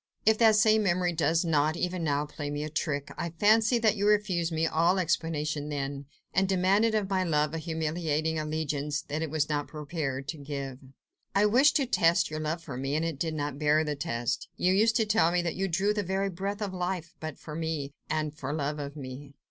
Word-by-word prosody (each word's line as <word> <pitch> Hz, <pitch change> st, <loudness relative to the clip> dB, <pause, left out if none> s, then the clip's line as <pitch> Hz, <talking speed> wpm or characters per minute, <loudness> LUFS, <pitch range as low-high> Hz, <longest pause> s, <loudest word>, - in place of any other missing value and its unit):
If 220 Hz, 0 st, +4 dB
that 220 Hz, -2 st, +6 dB
same 215 Hz, 0 st, +5 dB
memory 180 Hz, -3 st, +1 dB
does 165 Hz, +2 st, +1 dB
not, 155 Hz, 0 st, +2 dB
even 180 Hz, -1 st, -2 dB
now, 145 Hz, -1 st, +1 dB
play 150 Hz, 0 st, -6 dB
me 145 Hz, 0 st, -3 dB
a 155 Hz, -, -5 dB
trick, 145 Hz, -2 st, -2 dB
I 170 Hz, -, -2 dB
fancy 215 Hz, +7 st, +3 dB
that 225 Hz, -2 st, +3 dB
you 205 Hz, 0 st, 0 dB
refused 195 Hz, -5 st, +2 dB
me 160 Hz, 0 st, +1 dB
all 170 Hz, +4 st, +2 dB
explanation 155 Hz, -4 st, -1 dB
then, 140 Hz, -1 st, -4 dB, 0.3 s
and 195 Hz, 0 st, +2 dB
demanded 195 Hz, +4 st, +3 dB
of 210 Hz, -2 st, +1 dB
my 190 Hz, -1 st, +1 dB
love 150 Hz, -3 st, +1 dB
a 165 Hz, -, -2 dB
humiliating 160 Hz, -1 st, -1 dB
allegiance 150 Hz, -1 st, -2 dB
it 155 Hz, +2 st, -2 dB
was 150 Hz, -1 st, 0 dB
not 145 Hz, -3 st, -1 dB
prepared 145 Hz, -3 st, -4 dB
to 160 Hz, -, -3 dB
give." 140 Hz, -2 st, -5 dB, 0.6 s
"I 200 Hz, +1 st, +5 dB
wished 255 Hz, +8 st, +5 dB
to 275 Hz, -, +3 dB
test 170 Hz, -10 st, +2 dB
your 155 Hz, -, -3 dB
love 155 Hz, +2 st, -3 dB
for 140 Hz, -5 st, -6 dB
me, 135 Hz, +2 st, -2 dB
and 160 Hz, +2 st, 0 dB
it 160 Hz, -4 st, -3 dB
did 160 Hz, 0 st, -1 dB
not 145 Hz, -2 st, -3 dB
bear 155 Hz, +1 st, +3 dB
the 150 Hz, -1 st, -2 dB
test. 120 Hz, -6 st, -2 dB
You 185 Hz, +1 st, +2 dB
used 220 Hz, +3 st, +3 dB
to 225 Hz, -, +3 dB
tell 210 Hz, -6 st, +3 dB
me 175 Hz, 0 st, +1 dB
that 170 Hz, -, -1 dB
you 195 Hz, +1 st, -1 dB
drew 190 Hz, +4 st, +1 dB
the 210 Hz, -, -1 dB
very 195 Hz, +1 st, -1 dB
breath 200 Hz, +4 st, -3 dB
of 195 Hz, -2 st, -4 dB
life 180 Hz, -2 st, -3 dB
but 155 Hz, -2 st, -6 dB
for 155 Hz, -, -9 dB
me, 155 Hz, -3 st, -3 dB, 0.2 s
and 155 Hz, -1 st, -1 dB
for 140 Hz, -2 st, -5 dB
love 150 Hz, 0 st, -2 dB
of 140 Hz, 0 st, -6 dB
me." 140 Hz, 0 st, -8 dB
160 Hz, 220 wpm, -28 LUFS, 150-190 Hz, 0.6 s, that